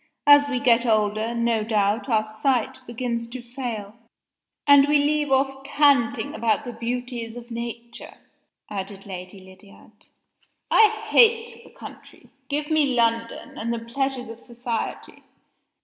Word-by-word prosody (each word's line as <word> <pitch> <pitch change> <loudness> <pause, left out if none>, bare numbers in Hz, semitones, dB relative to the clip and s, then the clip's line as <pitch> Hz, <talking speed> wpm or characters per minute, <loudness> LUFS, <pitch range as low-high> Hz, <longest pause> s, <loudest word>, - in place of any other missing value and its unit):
"As 290 0 +7
we 260 -3 -1
get 240 -2 +3
older, 215 0 0
no 235 -2 +1
doubt 215 +2 0
our 220 -2 +2
sight 255 +3 -1
begins 235 -1 -3
to 250 +2 -8
fail 240 -4 -6 0.4
" - - -62
"And 285 0 +7
we 295 0 +4
leave 295 0 +1
off 270 0 +1
canting 285 -1 +2
about 230 -3 0
the 245 - -6
beauties 235 0 -5
of 240 0 -11
Nature," 235 0 -7 0.5
added 195 -1 -7
Lady 185 0 -8
Lydiard. 195 +3 -18 0.6
"I 440 - +7 0.2
hate 460 0 +3
the - - -16
country. - - -14 0.2
Give 295 +2 -2
me 290 -5 +2
London, 230 -1 -1
and 230 +2 -2
the 235 - -1
pleasures 255 +2 -3
of 230 0 -9
society." 240 -1 -5
235 Hz, 140 wpm, -23 LUFS, 225-270 Hz, 0.6 s, As